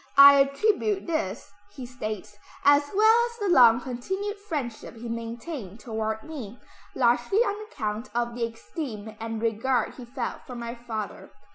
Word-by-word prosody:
"I 280 0 +10
attribute 390 +8 +1
this," 330 -1 -3 0.2
he 260 -3 -6
states, 215 -4 -6 0.3
"as 285 0 +5
well 435 +2 +6
as 470 -1 -12
the 410 -4 -1
long 235 -4 +7
continued 380 - -4
friendship 285 - -5
he 235 +1 -8
maintained 230 - -6
toward 220 -1 -3
me, 255 -8 -8 0.4
largely 240 +7 +2
on 425 -3 0
account 215 +1 -3
of 240 0 0
the 240 0 -3
esteem 225 - -7
and 225 0 -4
regard 230 +3 0
he 250 - -10
felt 245 0 -4
for 250 - -7
my 235 0 -5
father. 225 -3 -6
245 Hz, 150 wpm, -26 LUFS, 225-295 Hz, 0.4 s, I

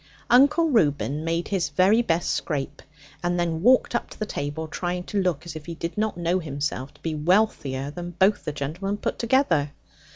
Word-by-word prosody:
Uncle 285 +7 +5
Reuben 150 - +1
made 165 +1 -1
his 185 -8 0
very 190 +9 +4
best 170 -7 0
scrape, 145 -2 -3 0.4
and 175 +1 0
then 165 -2 -1
walked 250 +5 +4
up 240 - -1
to - - -12
the 215 - -2
table, 150 -3 -4
trying 180 +2 -3
to 200 +2 -1
look 175 -4 -1
as 170 -2 -7
if 155 0 -8
he 170 - -5
did 170 +1 -5
not 215 -3 -1
know 175 +2 +1
himself 140 -4 -4
to - - -23
be 165 - -2
wealthier 150 -5 +1
than 175 +2 -6
both 195 +3 +3
the - - -3
gentlemen 175 +9 -3
put - - -3
together. 200 - +2
170 Hz, 195 wpm, -25 LUFS, 150-200 Hz, 0.4 s, Uncle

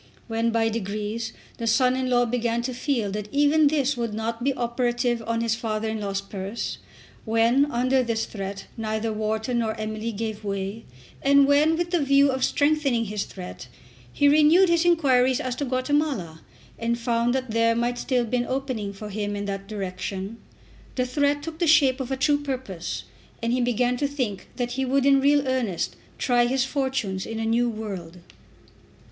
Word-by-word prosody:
When 225 0 0
by 225 -1 +2
degrees 215 +1 -3 0.3
the 230 - -3
son 250 +3 +3
in 260 0 -1
law 245 -1 +3
began 235 0 -1
to 255 +1 -3
feel 245 -5 -1
that 210 +1 -4
even 290 +2 +4
this 285 -2 +1
would 230 -3 -3
not 230 +2 -3
be 275 - +2
operative 240 0 0
on 230 0 0
his 230 -1 +1
father 220 -1 -2
in 220 0 -3
law's 195 -1 -2
purse, 195 +2 -5 0.4
when 235 +6 +3
under 255 +2 +2
this 230 -2 -1
threat 195 -1 -6
neither 220 0 -2
Wharton 220 +3 -1
nor 220 -2 -1
Emily 215 +1 -3
gave 220 0 -4
way, 200 +2 -4 0.4
and 280 0 +5
when, 295 +3 +4
with 345 0 -2
the 350 - +2
view 275 0 +4
of 260 -1 -2
strengthening 285 -5 +2
his 210 -1 -3
threat, 180 -9 -9 0.4
he 285 - +3
renewed 310 +5 +6
his 340 0 +3
inquiries 260 -7 +3
as 255 -1 -3
to 285 - -1
Guatemala 255 - -1 0.4
and 235 +1 0
found 235 +1 +1
that 260 -3 -2
there 230 +1 +3
might 240 +1 -1
still 250 -3 0
be 250 +2 -1
an 245 - -1
opening 255 -6 -3
for 210 +2 -8
him 205 0 -2
in 205 0 -3
that 195 0 -4
direction, 195 +1 -5 0.6
the 255 - +1
threat 285 +2 +1
took 325 0 -7
the 345 - +2
shape 280 -4 +5
of 260 -1 -4
a 265 - -1
true 290 +2 +2
purpose, 255 -11 -4 0.4
and 230 +1 +1
he 250 - +1
began 245 +1 +1
to 285 - 0
think 255 -9 -3
that 245 -1 -2
he 265 +2 -1
would 265 +1 +1
in 275 -1 +5
real 285 0 +3
earnest 245 -9 -1 0.2
try 240 -1 +3
his 260 0 +1
fortunes 265 -9 -2
in 225 - -5
a 225 - -1
new 235 +2 +2
world. 195 -6 -6
240 Hz, 185 wpm, -25 LUFS, 220-270 Hz, 0.6 s, renewed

